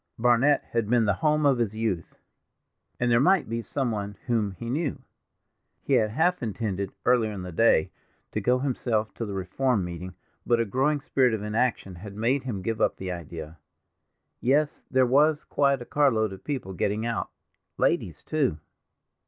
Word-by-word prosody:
Barnet 125 +5 +3
had 115 -3 0
been 120 -2 +3
the 100 - +3
home 150 -1 +2
of 135 -3 +4
his 110 -3 -1
youth, 110 -7 -3 0.8
and 120 -1 +1
there 120 - +5
might 180 +6 +3
be 115 +1 -2
some 130 +1 -2
one 100 -2 -4
whom 110 -5 0
he 115 +6 -8
knew. 145 +4 -2 0.8
He - - -1
had 110 - +4
half 170 +10 +1
intended, 100 -4 -3
earlier 120 -3 +3
in 100 -3 -6
the 90 - -6
day, 85 -3 +3 0.4
to 105 - -2
go 125 +5 +3
himself 120 -5 -1
to 115 - -5
the 100 - -5
Reform 100 +4 0
meeting, 90 +1 -7 0.3
but 120 -1 +2
a 115 - +2
growing 135 +7 +1
spirit 130 -4 +2
of 105 - -5
inaction 105 -2 -1
had 100 +3 -10
made 120 +6 +1
him 100 -7 -4
give 110 +1 -2
up - - +2
the 95 -1 -4
idea. 80 -2 -7 0.8
Yes, 145 +4 +1
there 130 -1 +4
was 150 +4 +3
quite 140 -3 +1
a - - -15
carload 125 -9 +2
of 95 - -11
people 130 -10 -4
getting 105 +5 -1
out—ladies, 115 -1 -3
too. 140 - 0
115 Hz, 175 wpm, -26 LUFS, 100-130 Hz, 0.8 s, there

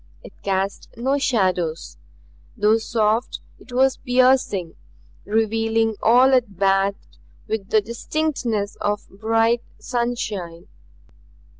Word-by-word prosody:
It - - -12
cast 195 0 -2
no 265 +4 0
shadows; 185 - -1 0.6
though 215 +1 +3
soft, 220 +1 0 0.2
it 250 - -16
was 260 +2 +2
piercing, 250 - +2 0.5
revealing 225 +1 +1
all 250 +4 +5
it 235 -7 +1
bathed 195 +1 0 0.3
with 215 -3 -3
the 215 - +4
distinctness 235 -2 -2
of 205 0 -2
bright 225 +2 +2 0.2
sunshine. 220 -9 -4
225 Hz, 100 wpm, -22 LUFS, 200-245 Hz, 0.6 s, all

